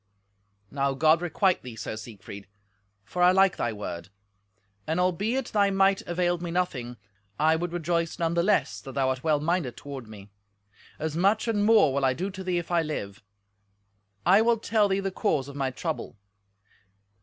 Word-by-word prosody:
"Now 140 -1 0
God 155 +4 +4
requite 180 +2 +1
thee, 125 -3 -9
Sir 110 - -5
Siegfried, 100 -3 -10 0.6
for 180 +11 -4
I 180 0 +7
like 195 0 +4
thy 120 - -1
word; 100 -4 -6 0.8
and 160 +2 0
albeit 205 +8 0
thy 200 -2 +2
might 195 0 +3
availed 175 0 0
me 175 - -4
nothing, 130 -9 -2 0.4
I 160 +1 +3
would 175 +1 -3
rejoice 170 -1 -1
none 165 -1 0
the 170 - +2
less 205 +5 +1
that 135 - -9
thou 135 -1 +1
art 130 -1 -3
well 155 -2 +2
minded 155 -5 -1
toward 135 -5 -8
me; 105 -2 -12 0.7
as 155 -1 -3
much 200 +6 +2
and 210 -3 +1
more 215 -10 +5
will 140 0 -1
I 130 -1 +2
do 190 +6 -3
to 190 0 -8
thee 180 -1 -1
if 175 0 -4
I 170 -1 +3
live. 100 -11 -5 1.0
I 195 +4 +6
will 230 0 +3
tell 215 -1 +2
thee 195 0 0
the 195 0 -2
cause 155 - 0
of 140 - -10
my 135 -2 -1
trouble. 155 -2 -5
170 Hz, 180 wpm, -27 LUFS, 135-190 Hz, 1.0 s, I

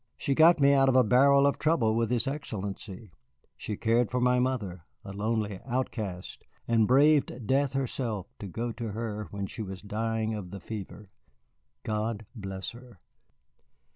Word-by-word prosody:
She 140 - 0
got 165 +3 +6
me 140 0 +5
out 135 -1 +4
of 130 - +2
a 130 - +7
barrel 140 +5 +5
of 140 - +1
trouble 140 -9 +2
with 115 -1 +1
his 120 -2 +1
Excellency. 105 - -5 0.4
She 105 - -5
cared 115 0 +2
for 125 - -1
my 125 0 +3
mother, 105 -10 -2 0.2
a 100 - -7
lonely 105 -1 -2
outcast, 110 -8 -4 0.2
and 115 -2 +3
braved 140 -2 +3
death 135 +3 +1
herself 120 -7 -2
to 100 - -6
go 115 +5 -3
to 115 -2 -5
her 105 -2 -4
when 100 +1 -4
she 105 - -7
was 95 -2 -7
dying 110 +1 -2
of 100 -4 -5
the 100 - -7
fever. 105 -1 -8 0.7
God 110 0 -2
bless 95 -3 -5
her!" 120 -4 -15
115 Hz, 165 wpm, -28 LUFS, 105-130 Hz, 0.7 s, a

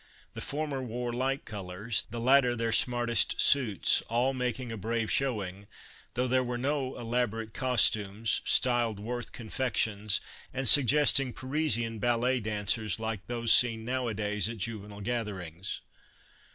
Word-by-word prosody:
The - - -7
former 145 -2 -3
wore 120 0 -4
light 135 +3 -2
colors, 105 +2 -2
the 120 - -5
latter 125 0 +4
their 115 -1 -1
smartest 120 -2 +2
suits, 120 -9 +3
all 120 +4 +1
making 125 -1 -3
a - - -4
brave 115 +2 -2
showing, 100 -7 -2 0.5
though 125 +1 +1
there 130 +1 +2
were 125 -1 -3
no 135 0 -2
elaborate 115 -2 -2
costumes, 110 -4 +1
styled 120 -4 +2
Worth 120 +3 -5
confections 110 -3 -1 0.3
and 135 0 -1
suggesting 135 +1 +6
Parisian 130 -5 -2
ballet 120 +3 +1
dancers, 105 -1 -1
like 110 -3 -4
those 115 -1 -1
seen 115 -2 +3
nowadays 110 -5 -1
at 115 - -6
juvenile 105 -1 -6
gatherings. 100 -6 -5
115 Hz, 130 wpm, -29 LUFS, 105-125 Hz, 0.5 s, suggesting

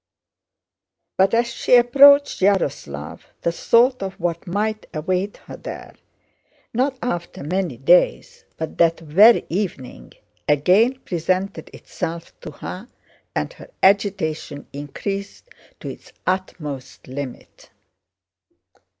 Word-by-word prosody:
But 195 +3 +3
as 235 +1 +3
she 250 - +3
approached 280 +4 +6
Yaroslávl 140 - 0 0.2
the 170 - +1
thought 240 +8 +3
of 195 +1 -5
what 170 +1 -3
might 215 +4 -2
await 185 +6 -2
her - - -9
there—not 260 +3 -7
after 175 -11 -4
many 175 -3 -2
days, 170 +8 +2
but 160 - -6
that 165 -1 +4
very 190 +9 +5
evening—again 180 - -1
presented 185 0 -2
itself 165 +1 -6
to - - -8
her 180 +8 -8 0.5
and - - -2
her - - -14
agitation 190 -7 +1
increased 195 - -6 0.3
to - - -5
its - - -11
utmost 160 -7 -4
limit. 130 -1 -8
185 Hz, 100 wpm, -21 LUFS, 155-210 Hz, 0.5 s, approached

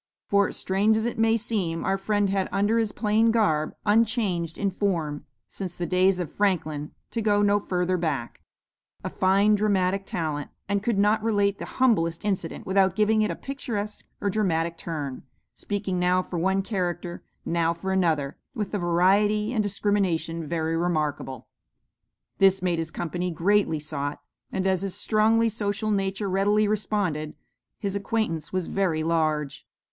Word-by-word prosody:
For, 200 -1 +2
strange 205 +3 +2
as 220 - -1
it 235 0 -3
may 225 0 +4
seem, 195 -7 -2
our 195 - +2
friend 205 0 0
had 195 -1 0
under 205 +3 +2
his 220 -2 0
plain 215 +2 +2
garb 180 -10 +1
unchanged 205 -6 +1
in 200 -1 0
form 170 -7 -2 0.2
since 185 -3 -6
the 175 - -3
days 185 +1 +3
of 175 -4 -4
Franklin, 155 -7 -1 0.2
to 230 - -2
go 205 -1 +3
no 205 0 +4
further 180 -2 0
back 145 -8 -3 0.6
a - - -4
fine 195 +3 +3
dramatic 195 -2 +1
talent, 150 -3 -3 0.2
and 200 0 0
could 220 0 0
not 210 +2 +3
relate 205 -2 +1
the - - -5
humblest 200 -9 +2
incident 190 -5 -2
without 190 -1 +2
giving 215 0 +3
it 215 - +1
a - - -2
picturesque 225 -7 -5
or 200 - 0
dramatic 170 -5 0
turn, 145 -6 -5 0.3
speaking 200 -3 -3
now 180 +1 +2
for 175 -1 -4
one 190 +3 +1
character, 175 -4 -3 0.2
now 165 -1 +1
for 170 +3 -4
another, 160 -7 0 0.2
with 210 -4 -3
a 205 - 0
variety 200 +6 +2
and 220 - +2
discrimination 185 -6 0
very 160 0 -1
remarkable. 155 -6 -2 0.9
This 195 -1 +4
made 175 -2 +1
his 165 -1 -2
company 175 +3 -3
greatly 180 -1 +2
sought, 145 -1 -4 0.3
and 190 - -2
as 190 -1 +2
his 195 -2 -2
strongly 225 +1 +3
social 215 0 -1
nature 195 0 -1
readily 205 +3 +2
responded, 200 -7 -1 0.4
his 200 -2 -3
acquaintance 200 -6 -2
was 185 -2 -1
very 170 -5 0
large. 155 -3 -1
190 Hz, 160 wpm, -26 LUFS, 170-210 Hz, 0.9 s, may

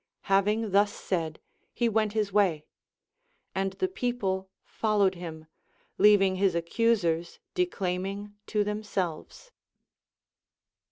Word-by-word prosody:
Having 205 +2 +2
thus 205 +1 +4
said, 165 -4 -3 0.4
he 240 - +2
went 215 -2 +1
his 210 -3 -1
way; 180 -7 +2 0.9
and 195 0 -1
the 375 - 0
people 205 - -2 0.2
followed 205 -3 +1
him, 165 -3 -8 0.5
leav 205 0 +7
ing 190 -1 +1
his 190 -2 +2
accusers 170 -2 +1 0.2
declaiming 200 - -2
to 210 -2 +1
themselves. 210 - -4
200 Hz, 105 wpm, -28 LUFS, 185-215 Hz, 0.9 s, leav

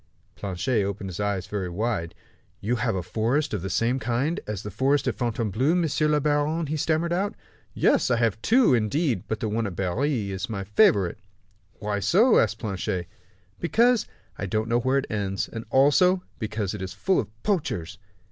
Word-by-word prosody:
Planchet 105 +4 -1
opened 100 -1 -4
his 90 - -7
eyes 100 -2 -1
very 100 -3 -3
wide. 100 -3 -2 0.5
"Have 120 0 0
you - - -2
a - - -5
forest 115 - 0
of 105 - -1
the 95 - -4
same 115 +7 +1
kind 125 +8 -1
as 105 -2 -4
the 105 - -6
forest 135 +8 +1
at - - +1
Fontainebleau, 120 - 0
monsieur 160 -3 +1
le 150 0 +3
baron?" 150 +3 +1
he 155 +2 -2
stammered 160 +3 0
out. 195 +3 -1 0.4
"Yes; - - +3
I 125 - +3
have 115 -2 0
two, 240 - +4
indeed, 120 - +1
but 110 - -3
the 110 - 0
one 110 +1 -1
at 95 - -6
Berry 105 - -1
is 95 +3 -4
my 100 -3 -3
favorite." 100 -1 +3 0.5
"Why 105 -1 -3
so?" 200 - +4
asked 110 0 +1
Planchet. 95 -5 -3 0.5
"Because 230 - +3 0.3
I 100 - -2
don't 110 +4 -1
know 120 +1 +3
where 130 +3 +1
it 140 - 0
ends; 100 -2 -2
and, 115 0 -7
also, 180 +9 +4 0.2
because 110 -3 -2
it 105 - -6
is 95 -1 -5
full 190 -1 +1
of 105 - -3
poachers." 145 - -2
115 Hz, 185 wpm, -25 LUFS, 100-145 Hz, 0.5 s, two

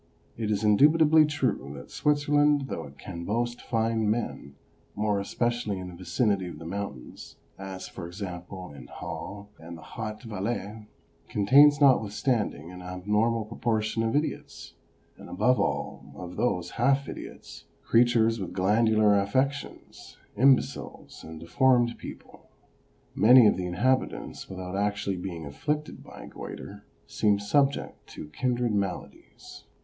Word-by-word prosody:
It 110 -2 -3
is 105 0 0
indubitably 155 +8 +5
true 130 - -2
that - - -11
Switzerland, 145 0 +2
though - - -4
it 70 0 -14
can 85 -2 -7
boast 120 +5 -2
fine 115 -2 0
men, 105 -10 -3 0.4
more 105 -1 0
especially 120 0 -1
in 90 -1 -6
the - - -10
vicinity 95 +1 0
of 85 - -8
the 80 - -10
mountains, 90 -8 -7 0.2
as, 95 -1 -7
for 85 - -8
example, 90 -1 -7
in 65 -4 -11
Hasle 100 0 -7
and 85 +1 -9
the 80 - -13
Haut 110 -1 -7
Valais, 105 0 -4 0.4
contains 140 +8 +6
notwithstanding 110 - +2
an 90 0 -10
abnormal 105 +5 0
proportion 110 0 -1
of 115 +3 0
idiots, 150 +2 -3 0.4
and - - -12
above 125 +7 +2
all 70 +1 -3
of 90 +1 -8
those 90 -8 -1
half 140 0 +3
idiots, - - -9 0.2
creatures 115 -1 +3
with 95 - -5
glandular 105 +1 +3
affections, 135 +7 -3 0.2
imbeciles 130 +4 +1
and 80 0 -9
deformed 120 - +2
people. - - -11 0.6
Many 125 +2 +7
of 105 - +5
the 90 -1 -3
inhabitants, 130 +9 -1
without 95 0 -6
actually 100 -1 -1
being 85 -3 -6
afflicted 150 - -4
by - - -11
goitre, - - -9 0.2
seem 105 -1 +1
subject 140 +7 0
to 75 - -8
kindred 120 +5 -1
maladies. 100 -3 -5
105 Hz, 135 wpm, -27 LUFS, 95-120 Hz, 0.6 s, Many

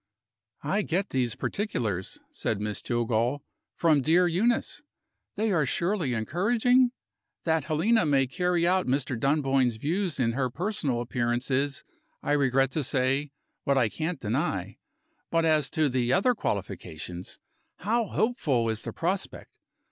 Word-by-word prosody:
"I 205 - +1
get 190 +1 -1
these 125 -3 0
particulars," 110 - -2
said 110 - -2
Miss 105 0 -3
Jillgall, 120 +3 0 0.3
"from 155 -4 +3
dear 170 +6 +4
Euneece. 225 - 0 0.5
They 220 0 0
are 155 -6 +2
surely 170 -5 0
encouraging? 235 - +3 0.5
That 160 -3 +1
Helena 170 +5 +2
may 135 -2 +3
carry 175 +5 0
out 185 +1 +2
Mr. 130 0 0
Dunboyne's 135 -1 +2
views 165 - -1
in 115 -2 +2
her 130 +1 -1
personal 150 - -2
appearance 120 +1 -1
is, 140 +2 0 0.4
I - - -1
regret 135 -2 +3
to 155 +2 -1
say, 135 +2 0 0.3
what 140 -1 +2
I 120 -4 +3
can't 160 - -3
deny. 105 -5 -2 0.5
But 165 0 +2
as 155 -3 +3
to 155 -1 +2
the 125 -2 0
other 200 +7 +3
qualifications, 90 - -5 0.4
how 225 +3 0
hopeful 150 - +1
is 110 0 -2
the - - -6
prospect! 185 +3 -3
140 Hz, 140 wpm, -27 LUFS, 120-180 Hz, 0.5 s, dear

